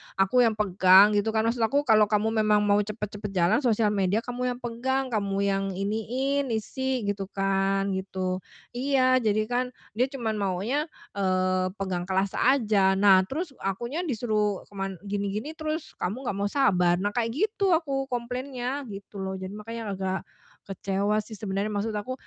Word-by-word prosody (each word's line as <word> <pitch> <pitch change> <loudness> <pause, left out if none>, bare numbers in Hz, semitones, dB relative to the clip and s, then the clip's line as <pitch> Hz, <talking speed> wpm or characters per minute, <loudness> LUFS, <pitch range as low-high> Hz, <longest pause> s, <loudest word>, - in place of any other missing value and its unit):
aku 195 +6 +3
yang 220 - 0
pegang 195 0 +6
gitu 215 +2 0
kan, 220 - +3
maksud 230 +1 0
aku, 280 +6 +2
"Kalo 215 -4 +5
kamu 215 +1 +1
memang 210 -1 +3
mau 205 0 +3
cepet-cepet 210 0 -4
jalan 175 +8 +3
sosial 225 -5 +2
media 200 +2 +1
kamu 250 0 -3
yang - - -14
pegang, 260 +2 -1
kamu 200 -3 -1
yang 195 0 +1
iniin, 250 +8 -1
isi, 260 +2 -2
gitu 200 -1 -2
kan," 195 0 +1
gitu. 185 -1 -2 0.3
Iya, 255 0 +2
jadi 215 -2 +1
kan 250 +1 +1 0.3
dia 245 +5 +1
cuma 245 -5 -3
maunya, 210 - -1 0.2
eee, 185 -1 +1
pegang 185 -2 -3
kelas 190 +1 0
aja. 210 -7 +3
Nah 195 -1 +6
terus, 310 - -4
"Akunya 235 - -3
disuruh 215 -5 0
keman 195 -1 -4
gini-gini 205 +7 -3
terus 315 0 -5
kamu 220 +9 -3
gak 195 - -6
mau 200 - +1
sabar," 180 -9 +3
nah 200 +3 -1
kayak 230 +1 -1
gitu 395 -1 +2
aku 275 -4 -1
komplainnya 250 +2 -4
gitu 200 0 -9
loh, 190 0 -3
jadi 190 0 -6
makanya 225 +2 -7 0.2
agak 190 0 -1 0.5
kecewa 200 +2 0
sih 215 +1 -4
sebenernya. 205 0 -3
Maksud 205 +2 -1
aku, 255 +5 -4
210 Hz, 165 wpm, -26 LUFS, 195-250 Hz, 0.5 s, pegang